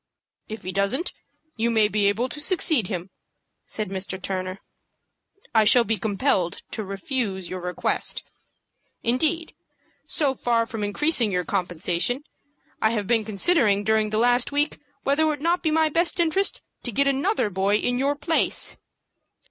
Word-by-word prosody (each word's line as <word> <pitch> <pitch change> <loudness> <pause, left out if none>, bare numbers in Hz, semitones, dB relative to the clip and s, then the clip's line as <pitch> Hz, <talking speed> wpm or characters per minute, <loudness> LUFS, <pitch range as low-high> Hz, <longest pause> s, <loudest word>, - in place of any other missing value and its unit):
"If 220 +1 -7
he 185 - -4
doesn't, 200 - 0 0.4
you 230 +1 +1
may 220 -2 +4
be 210 -1 +1
able 225 +5 +1
to 275 +4 -7
succeed 305 - +2
him," 185 -2 -5 0.5
said 215 -3 -4
Mr. 190 -1 -4
Turner. 185 0 -4 0.9
"I 220 -1 +5
shall 235 +3 +6
be 225 0 0
compelled 195 - 0
to 220 - -3
refuse 195 -1 -3
your 185 -1 -5
request. 180 0 -2 0.8
Indeed, 315 +8 +1 0.5
so 285 -4 +1
far 235 -3 +1
from 225 -2 -5
increasing 230 +2 +1
your 180 -1 0
compensation, 180 - -1 0.6
I 220 - +4
have 215 -3 -1
been 225 +1 +2
considering 210 - +3
during 220 0 +2
the 215 - -1
last 245 +3 +3
week 290 +1 0 0.2
whether 280 +3 +2
it 315 - +4
would 300 -2 -1
not 345 +2 +2
be 320 - +1
for 310 - +1
my 315 -1 +3 0.3
interest 345 +3 +1 0.2
to 245 - -3
get 280 +6 +2
another 275 - +1
boy 195 +2 +1
in 245 +3 0
your 280 +2 +1
place." 325 +3 0
225 Hz, 155 wpm, -24 LUFS, 195-280 Hz, 0.9 s, shall